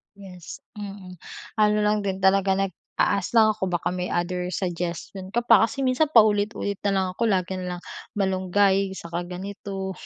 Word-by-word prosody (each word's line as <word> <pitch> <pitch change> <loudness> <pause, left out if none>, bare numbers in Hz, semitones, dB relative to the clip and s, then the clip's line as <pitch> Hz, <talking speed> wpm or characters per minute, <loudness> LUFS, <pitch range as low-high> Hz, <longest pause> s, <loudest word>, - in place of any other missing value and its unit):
Yes, 185 -4 -11
mm. 195 -3 -8 0.4
Ano 210 0 +4
lang 210 0 +2
din 190 -1 -2
talaga 190 0 +4
nag-a-ask 195 +1 -1
lang 220 -1 +6
ako 190 -3 -3
baka 175 -1 -1
may 180 0 -3
other 180 +1 -2
suggestion 180 +2 -4
ka 240 0 +1
pa, 225 -2 +6
kasi 275 +2 -4
minsan 260 +4 +2
paulit-ulit 205 -2 +3
na 200 - +3
lang 190 -1 +2
ako, 230 +5 0
lagi 185 -2 0
na 180 -1 -4
lang 175 - -10 0.3
malunggay, 190 0 +2
saka 170 0 -5
ganito, 195 +1 -5
195 Hz, 160 wpm, -24 LUFS, 180-205 Hz, 0.4 s, lang